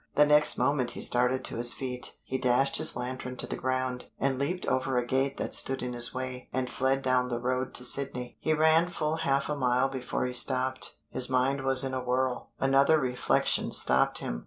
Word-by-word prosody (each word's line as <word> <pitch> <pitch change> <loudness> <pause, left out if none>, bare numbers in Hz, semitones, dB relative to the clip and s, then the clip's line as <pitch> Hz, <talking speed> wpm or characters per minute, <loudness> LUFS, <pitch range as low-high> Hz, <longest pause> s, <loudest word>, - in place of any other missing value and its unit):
The 150 - +6
next 150 0 +4
moment 135 -4 +1
he - - -6
started 125 +1 +1
to - - 0
his 120 +1 +2
feet, 125 -2 -4
he 130 - -4
dashed 125 +2 +2
his - - +1
lantern 125 +1 -5
to - - -2
the - - -5
ground, 130 -1 -2
and 135 -1 0
leaped 175 +6 -2
over 130 0 0
a 125 - 0
gate 135 +2 -1
that - - -3
stood 135 -1 +1
in 125 0 -4
his 120 0 0
way, 130 0 -6
and 130 0 -2
fled 135 +2 0
down 125 -1 +1
the 120 -1 -2
road 130 +1 -2
to 125 - -1
Sydney. 125 -2 -1
He 155 - 0
ran 160 +2 +4
full 155 -2 -2
half 140 -4 0
a 150 - -2
mile 130 -1 +1
before 130 -1 -3
he 125 - -3
stopped; 130 +1 0 0.2
his 130 0 +2
mind 130 +2 +1
was 135 0 +2
in 135 -1 -3
a 130 - -2
whirl. 125 0 -1
Another 135 +3 +4
reflection 125 -3 0
stopped 65 0 +2
him. - - -4
130 Hz, 210 wpm, -28 LUFS, 125-135 Hz, 0.2 s, The